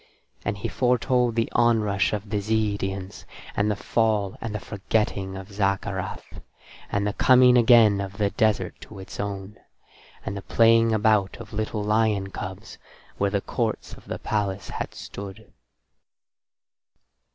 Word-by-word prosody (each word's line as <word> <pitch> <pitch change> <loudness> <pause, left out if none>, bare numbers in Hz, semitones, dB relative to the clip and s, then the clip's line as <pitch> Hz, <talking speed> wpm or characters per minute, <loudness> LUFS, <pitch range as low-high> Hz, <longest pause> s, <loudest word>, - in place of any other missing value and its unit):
And 105 - -2
he 100 - -3
foretold 125 -1 +1
the 115 -1 +1
onrush 110 -5 +2
of 105 0 -4
the 105 - +1
Zeedians, 100 -2 -2 0.3
and 105 +1 +1
the 105 - +1
fall 105 -2 0
and 110 -2 -4
the - - -2
forgetting 100 -2 -2
of 95 +1 -9
Zaccarath, 100 -1 -3 0.5
and 100 0 0
the 105 - -1
coming 125 0 +6
again 115 -4 +6
of 100 0 -6
the 100 -2 +1
desert 110 -1 +1
to 110 - -11
its 95 - -9
own, 100 0 -5 0.7
and 100 - -3
the 100 - -5
playing 115 +2 +4
about 110 -2 +2
of - - -11
little 110 0 -2
lion 105 -2 +1
cubs 95 +4 -7 0.4
where 100 - +2
the 100 0 -1
courts - - -3
of - - -13
the - - -4
palace 100 -2 -2
had - - -5
stood. 100 -1 -9
105 Hz, 145 wpm, -25 LUFS, 100-110 Hz, 0.7 s, coming